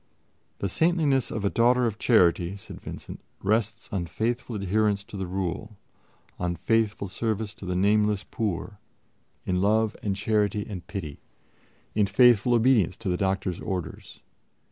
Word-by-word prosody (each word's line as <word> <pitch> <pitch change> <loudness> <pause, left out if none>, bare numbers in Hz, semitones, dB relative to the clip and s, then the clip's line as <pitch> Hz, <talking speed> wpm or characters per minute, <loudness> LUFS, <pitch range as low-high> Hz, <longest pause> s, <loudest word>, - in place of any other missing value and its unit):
"The 100 - -2
saintliness 150 - +2
of 105 -2 -3
a - - +3
Daughter 125 +2 +3
of 110 -2 -2
Charity," 90 -4 +3
said 95 - -11
Vincent, - - -8 0.2
"rests 110 +2 0
on 90 -4 -2
faithful 120 +5 -2
adherence 100 +1 +1
to 105 - -12
the 95 -2 -3
Rule; 95 +3 -4 0.6
on 90 -1 -1
faithful 110 +2 0
service 110 +1 -2
to 105 -4 -10
the 90 - -1
nameless 105 +1 +2
poor; 105 -1 -4 0.7
in 90 0 0
love 110 +2 +2
and 100 -2 -1
charity 105 0 0
and 95 -5 -7
pity; 80 -8 -6 0.7
in 105 -1 +2
faithful 120 +3 +5
obedience 115 -7 +3
to 110 - -4
the 90 - +1
doctor's 95 -1 -1
orders 90 -4 -5
105 Hz, 145 wpm, -26 LUFS, 95-110 Hz, 0.7 s, faithful